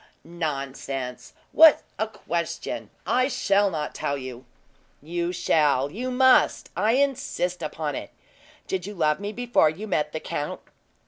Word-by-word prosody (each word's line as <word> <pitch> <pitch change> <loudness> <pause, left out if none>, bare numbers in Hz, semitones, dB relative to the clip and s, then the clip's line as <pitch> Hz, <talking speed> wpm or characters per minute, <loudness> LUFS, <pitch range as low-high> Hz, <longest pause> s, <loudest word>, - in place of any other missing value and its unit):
"Nonsense. 135 -6 -5 0.2
What 320 -2 +7 0.2
a 220 - +1
question! 170 -6 -4 0.2
I 255 +1 +2
shall 205 -6 +2
not 155 -4 -3
tell 140 - -2
you." 130 -1 -8 0.5
"You 170 +3 -3
shall 150 -6 +2
you 245 +8 -4
must 260 0 +4
I 210 +5 +2
insist 265 -10 0
upon 155 -1 -3
it. - - -5 0.6
Did 190 0 -3
you 205 - -7
love 155 -2 +1
me 205 +1 -4
before 240 -8 +3
you 180 +8 -6
met 150 -6 0
the 160 - -4
count? 145 -1 -4
170 Hz, 140 wpm, -25 LUFS, 150-220 Hz, 0.6 s, What